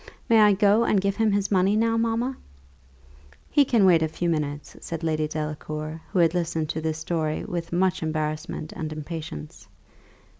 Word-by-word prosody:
May 225 -1 +5
I 210 -1 +6
go 205 +3 +4
and 210 -3 +2
give 200 +1 -1
him 220 -2 +2
his 200 0 0
money 195 +1 +3
now, 225 +1 +2
mamma?" 230 +3 0 1.2
"He 290 - +5
can 235 -7 +3
wait 170 -3 +5
a 160 - +2
few 170 +2 -2
minutes," 150 -2 -3
said 165 -1 -6
Lady 155 -1 0
Delacour, 155 +1 -5
who 195 - -2
had 170 -2 +4
listened 165 -3 -1
to 160 0 -3
this 160 0 -2
story 160 -1 -2
with 170 -1 -4
much 180 +1 +1
embarrassment 155 0 -3
and 155 -1 -5
impatience. 155 - -7
165 Hz, 175 wpm, -25 LUFS, 155-200 Hz, 1.2 s, I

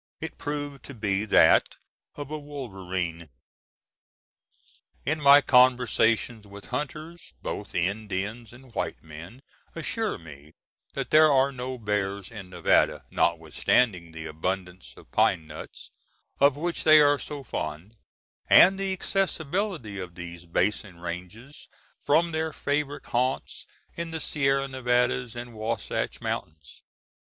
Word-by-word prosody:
It - - -7
proved 145 -1 -4
to 140 - -9
be 105 -2 0
that 105 - +5 0.4
of 145 0 -7
a 155 - -3
wolverine. 95 - -5 1.8
In 155 +1 0
my 140 0 +8
conversations 125 -4 +3
with 100 0 -11
hunters, 155 - -5
both - - -5
Indians 100 +4 -2
and 125 0 -16
white - - -3
men 80 - -11 0.3
assure 220 +6 -1
me 75 -2 -13 0.4
that - - -4
there 155 0 +7
are 135 0 +4
no 130 0 -5
bears 100 -2 -2
in 100 -5 -9
Nevada, 90 - +2
notwithstanding 85 +3 +1
the 80 0 -8
abundance 90 +3 -4
of - - -17
pine 80 - +2
nuts, - - -10 0.5
of 140 0 +5
which 170 +3 -2
they 155 -1 +8
are 145 -1 +5
so 145 -2 -6
fond, 85 0 -5 0.5
and 190 +1 +7
the 195 -1 -1
accessibility 180 - -2
of 90 -2 -7
these 85 -1 -9
basin 90 +1 -1
ranges 90 - -8 0.3
from 165 +4 +2
their 160 0 -1
favorite 145 -1 -2
haunts 130 +2 -2 0.3
in 170 0 -4
the 160 0 -4
Sierra 135 -2 +1
Nevada 125 -1 +1
and 120 0 -7
Wahsatch 110 0 -3
Mountains. 75 -2 -5
120 Hz, 125 wpm, -26 LUFS, 95-145 Hz, 1.8 s, my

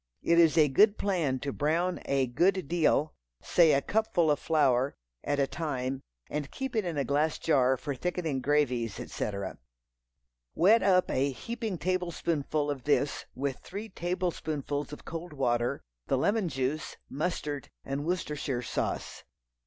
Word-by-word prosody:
It 170 0 +4
is 165 -1 +5
a 155 -2 +7
good 205 +10 +5
plan 170 -10 0
to 140 0 -3
brown 170 +5 0
a 135 -1 +2
good 180 +8 +1
deal—say 155 - +2
a 140 -1 +2
cupful 190 -7 +2
of 145 - +1
flour—at 130 - 0
a 140 - +4
time, 135 -3 -3 0.3
and 145 -1 -3
keep 265 -2 -5
it 215 -3 +1
in 170 -4 -3
a 140 - +2
glass 150 +4 +1
jar 130 -4 +3
for 140 +3 -4
thickening 160 -2 -2
gravies, 125 -6 +1
etc. 100 -2 -4 1.0
Wet 205 +8 +5
up 185 -2 +3
a 135 +2 +2
heaping 225 - -4
tablespoonful 165 -5 -1
of 135 -3 -6
this 145 -1 +1
with 135 0 -2
three 205 +4 -7
tablespoonfuls 160 -6 -2
of 150 - -9
cold 165 0 -6
water, 125 -1 0 0.2
the 135 - +2
lemon 200 - +1
juice, 135 +2 -2
mustard 150 -2 -3 0.2
and 135 +1 -3
Worcestershire 150 -7 -2
sauce. - - -3
150 Hz, 145 wpm, -29 LUFS, 135-175 Hz, 1.0 s, a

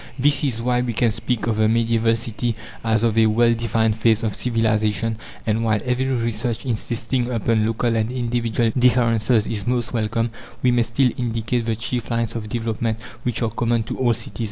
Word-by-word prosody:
This 145 +3 +2
is 115 -5 -1
why 125 0 +2
we 120 -1 -2
can 115 +1 +2
speak 115 0 -2
of 115 -2 0
the 110 0 +3
medieval 115 0 +2
city 115 +1 -2 0.3
as 110 -1 +1
of 115 -2 +2
a 110 - +5
well 115 +2 +4
defined 115 -1 +1
phase 110 0 +2
of 110 -2 -1
civilization; 110 -2 0 0.3
and 110 +1 0
while 110 -1 +2
every 125 +1 0
research 115 -1 -2
insisting 120 +1 -2
upon 115 -2 +1
local 115 +1 0
and 110 +1 0
individual 120 -2 0
differences 115 -3 +3
is 105 -2 -4
most 120 -1 -1
welcome, 115 0 0 0.3
we 125 - +4
may 120 0 +3
still 120 +3 +2
indicate 115 0 -1
the 115 - +1
chief 115 +1 -3
lines 115 -1 -1
of 110 -2 -5
development 115 0 -2 0.2
which 120 -1 -1
are 115 - 0
common 115 0 0
to - - -5
all 120 -3 +3
cities. 100 - -5
115 Hz, 190 wpm, -22 LUFS, 110-120 Hz, 0.3 s, a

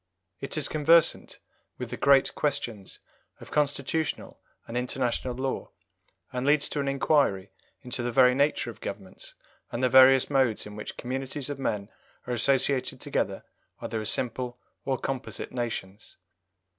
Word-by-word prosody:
It - - -3
is 150 - +1
conversant 160 +2 +3 0.4
with - - -6
the - - -2
great 140 -1 +4
questions 130 -9 -3 0.4
of - - -13
constitutional 150 +1 -1 0.3
and 115 - -7
international 125 0 -1
law, 130 +1 -3 0.6
and 125 0 -2
leads 145 +1 +3
to 150 - -3
an 140 - -1
inquiry 135 -8 +1 0.3
into 125 -1 -3
the 120 0 -2
very 125 0 +6
nature 140 -3 +1
of 110 - -18
governments 95 -2 -8 0.4
and 120 - -3
the 130 - +4
various 130 0 +7
modes 130 -6 +1
in 105 0 -9
which 105 - -7
communities 135 +2 -4
of 140 - -6
men 105 -6 -2 0.4
are 125 - -3
associated 130 +2 +1
together - - -2 0.4
either 110 -1 -4
as 110 - -1
simple 125 0 -1 0.3
or 135 -1 0
composite 135 +1 -5
nations. 115 -4 -5
130 Hz, 145 wpm, -27 LUFS, 120-140 Hz, 0.6 s, various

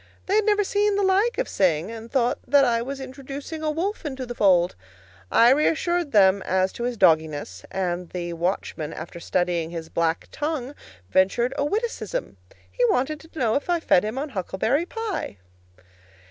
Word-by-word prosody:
They 385 - -1
had 430 - +2
never 415 -1 +3
seen 410 +1 +1
the 400 - +1
like 395 +5 +2
of - - 0
Sing, 175 0 +1
and 230 0 -8
thought 250 -1 +1
that 285 -1 +5
I 230 -2 +1
was 275 +3 -5
introducing 275 +4 -7
a 310 - 0
wolf 345 +7 -2
into 265 -4 -4
the 240 - -6
fold. 180 -6 +3 0.6
I 235 +2 +6
reassured 325 +3 +1
them 195 -2 +5
as 185 0 0
to 235 - -4
his 245 -1 -2
dogginess, 155 - +2
and 180 -2 -2
the 175 -1 -4
watchman, 170 -2 -3
after 170 +2 -8
studying 175 -2 -1
his 165 -1 -6
black 165 0 -1
tongue, 295 -3 -3 0.4
ventured 235 +7 +2
a - - 0
witticism. 460 +8 -3 0.3
He - - -1
wanted 305 - +1
to 325 0 -16
know 230 -4 +2
if 285 - -1
I 345 -1 +2
fed 195 - +3
him 215 +4 -3
on 290 +3 -3
huckleberry 225 - -1
pie. 450 - -4
245 Hz, 175 wpm, -24 LUFS, -, 0.6 s, I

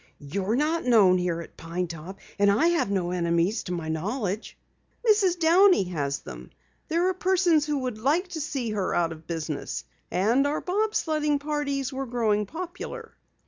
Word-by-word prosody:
"You're 190 +9 -2
not 310 +5 +1
known 205 -7 +5
here 175 -2 -1
at 165 - -13
Pine 170 +2 -3
Top, 170 +3 -8 0.2
and 200 0 +5
I 290 +12 +4
have 335 -11 +1
no 185 -3 0
enemies 170 +3 +1
to 180 - -5
my 170 -3 -3
knowledge." 200 +6 -3 0.5
"Mrs. 400 -5 +4
Downey 350 - +5
has 145 -5 -2
them. 60 0 -10 0.4
There 340 +3 +2
are - - 0
persons 360 -4 +2
who 295 -1 0
would 250 -5 -3
like 305 - +1
to 325 -3 -4
see 270 -6 -3
her 200 -3 -1
out 170 -1 +1
of 160 -1 -10
business. 160 -3 -4 0.3
And 235 +9 +2
our 295 +2 -1
bob 425 +4 -1
sledding 300 -2 +1
parties 280 -2 -2
were 270 0 -3
growing 215 -4 +1
popular." 365 - -7
240 Hz, 175 wpm, -26 LUFS, -, 0.5 s, known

